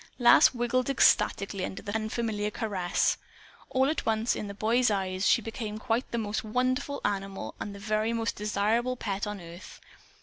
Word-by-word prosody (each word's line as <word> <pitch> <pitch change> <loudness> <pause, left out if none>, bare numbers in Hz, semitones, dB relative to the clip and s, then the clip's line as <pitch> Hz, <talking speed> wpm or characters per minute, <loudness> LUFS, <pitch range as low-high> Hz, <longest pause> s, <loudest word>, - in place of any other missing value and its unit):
Lass 240 -2 +7
wiggled 245 +1 0
ecstatically 200 -7 +3
under 190 - -5
the 205 - -5
unfamiliar 220 -1 -1
caress. 200 -5 0 0.5
All 260 +1 +2
at 310 +1 -1
once, 225 +1 +1
in 210 - -4
the 200 - -7
boy's 235 +4 +2
eyes, 190 -1 0
she 230 - +4
became 220 -1 -5
quite 230 +3 -1
the 235 - -3
most 215 -2 -2
wonderful 255 +5 -1
animal 195 -1 -3
and 200 - -5
the - - -9
very 215 +2 0
most 230 -1 -1
desirable 215 +4 0
pet 205 -4 -3
on 210 -1 -5
earth. 170 +1 -11
215 Hz, 170 wpm, -28 LUFS, 200-235 Hz, 0.5 s, Lass